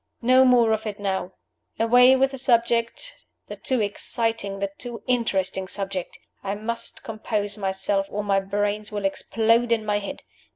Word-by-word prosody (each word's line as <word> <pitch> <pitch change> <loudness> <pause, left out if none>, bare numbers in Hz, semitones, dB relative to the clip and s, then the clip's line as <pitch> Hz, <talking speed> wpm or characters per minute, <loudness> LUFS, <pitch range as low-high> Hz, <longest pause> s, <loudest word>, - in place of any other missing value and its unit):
No 255 +2 +6
more 240 -3 +5
of 220 0 -1
it 205 -1 -5
now. 190 -2 -2 0.4
Away 245 +3 +6
with 270 +1 +2
the 270 - -6
subject 235 - +1 0.2
the - - -8
too 255 -3 -1
exciting, 210 0 -2
the 195 0 -3
too 240 -2 -6
interesting 190 -6 0
subject! 195 -2 -4 0.3
I 200 0 -2
must 225 +3 -4
compose 215 -2 -3
myself 195 0 -1
or 210 +1 -3
my 200 -1 +2
brains 205 +2 -2
will 205 -1 -3
explode 230 +4 +1
in 225 -2 +1
my 205 -1 +1
head. 200 - -7
215 Hz, 160 wpm, -24 LUFS, 195-235 Hz, 0.4 s, No